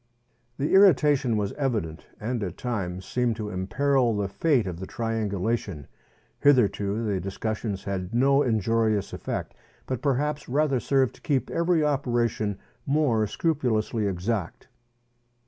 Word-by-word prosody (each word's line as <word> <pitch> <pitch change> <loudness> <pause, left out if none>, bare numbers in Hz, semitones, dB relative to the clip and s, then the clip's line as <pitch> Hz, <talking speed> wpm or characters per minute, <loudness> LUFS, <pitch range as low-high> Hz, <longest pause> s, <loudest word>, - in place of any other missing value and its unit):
The 145 - -1
irritation 145 - +5
was 100 -1 -1
evident, 110 - -2
and 120 +2 -2
at 90 -3 -4
times 95 -7 -3
seemed 125 0 0
to 105 -1 -5
imperil 120 +5 +1
the 100 -1 0
fate 130 +3 +1
of 90 -3 -5
the 95 - -6
triangulation. 110 -6 -2 0.5
Hitherto 115 -5 +3
the 100 -3 0
discussions 100 +2 -3
had 100 -2 -2
had 90 +5 -7
no 135 +3 +4
injurious 110 -3 +1
effect, - - -4 0.3
but 130 -2 -3
perhaps 145 +1 -1
rather 140 -1 +2
served 135 +1 +1
to - - -23
keep 140 -7 -1
every 170 -1 +2
operation 120 -7 0 0.3
more 135 -7 +2
scrupulously 115 -6 0
exact. 95 +1 -3
115 Hz, 130 wpm, -26 LUFS, 100-135 Hz, 0.5 s, irritation